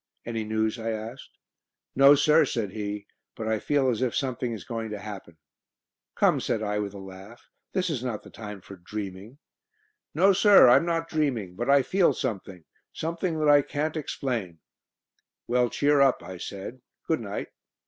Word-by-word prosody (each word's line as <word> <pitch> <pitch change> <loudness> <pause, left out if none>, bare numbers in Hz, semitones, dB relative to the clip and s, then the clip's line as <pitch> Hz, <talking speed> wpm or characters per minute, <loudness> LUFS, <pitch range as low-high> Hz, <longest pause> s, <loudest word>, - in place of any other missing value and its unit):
"Any 115 -1 -3
news?" 110 +1 -1
I 115 0 -3
asked. 110 +3 -7 0.6
"No, 140 +2 +8
sir," 150 +2 +5
said 115 -8 -2
he, 105 -1 -5 0.3
"but 110 - -5
I 110 -1 0
feel 145 +1 +1
as 125 -2 0
if 125 -3 0
something 130 -3 -2
is 110 -6 -6
going 115 -2 -5
to 105 - -5
happen." 100 -5 -9 0.8
"Come," - - +3
said 110 - -2
I, 105 0 -1
with 100 -1 -4
a - - -7
laugh, 95 +4 -12 0.3
"this 185 -1 0
is 130 -5 -3
not 120 -5 -4
the - - -14
time 105 -3 -8
for 100 +1 -12
dreaming." 100 +5 -7 0.8
"No, 195 +5 +5
sir, 200 -5 +7
I'm 135 +7 +5
not 165 -1 -1
dreaming, 130 - -1
but 120 +7 -3
I 140 -1 +5
feel 185 +6 +3
something 100 - -5 0.3
something 165 +1 -3
that 150 - +2
I 145 0 +7
can't 150 +3 -3
explain." 120 - -3 0.9
"Well, 125 0 +2
cheer 145 +2 +2
up," 135 -2 +3
I 95 -1 -8
said. 100 +7 -7 0.2
"Good 160 - 0
night." 105 -3 -5
115 Hz, 175 wpm, -26 LUFS, 105-145 Hz, 0.9 s, No